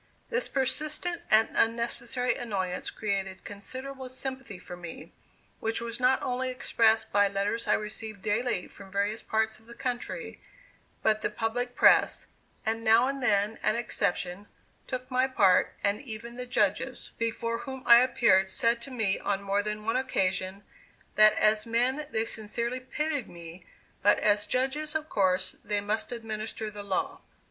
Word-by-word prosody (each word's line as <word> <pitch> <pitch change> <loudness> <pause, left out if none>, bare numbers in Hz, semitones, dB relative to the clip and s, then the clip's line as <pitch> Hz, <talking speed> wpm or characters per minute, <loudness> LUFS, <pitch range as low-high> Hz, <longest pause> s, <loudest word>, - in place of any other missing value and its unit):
This - - +1
persistent 305 +6 0
and 220 +1 +6
unnecessary 235 +2 0
annoyance 190 -7 -3
created 195 -3 -3
considerable 260 +6 -6
sympathy 260 -4 -5
for 180 0 -9
me, 175 -2 -9 0.5
which 225 0 -1
was 235 0 -5
not 255 +1 +3
only 255 +1 -1
expressed 225 -3 +2
by 205 0 +4
letters 200 +3 -1
I - - +4
received 215 -1 -4
daily 215 -2 0
from 195 -1 -13
various 200 +3 -1
parts 220 0 -1
of 225 - -23
the 235 - -11
country, 255 - -4 0.6
but 215 -1 +3
the - - 0
public 235 +3 -2
press, - - +5 0.4
with 220 +1 +1
now 225 +1 +5
and 275 +1 -2
then 210 -2 +1
an - - +2
exception, 200 -4 -2 0.4
took 255 0 -5
my 255 +1 +3
part, 195 -8 +3
and 200 +3 +1
even 235 -2 -7
the 250 0 -5
Judges, 225 +3 0
before 230 0 -1
whom 265 0 -7
I 235 0 +9
appeared, 235 -7 +4
said 230 +5 +1
to 275 - -7
me 220 -7 0
on 200 0 -1
more 200 +1 +1
than 210 0 -4
one 225 +3 +1
occasion, 195 -5 -1 0.5
that 215 0 +7
as 215 +1 +3
men 255 +6 +1
they 220 -5 0
sincerely 235 +3 -3
pitied 290 +1 -3
me, 170 +1 -11 0.3
but 205 +1 +5
as 205 0 +2
judges 295 +6 0
of 315 0 -2
course 185 -1 +1
they 205 0 0
must 210 +3 -2
administer 220 -2 -5
the 205 0 -8
law. 195 -2 -2
225 Hz, 155 wpm, -28 LUFS, 205-255 Hz, 0.6 s, I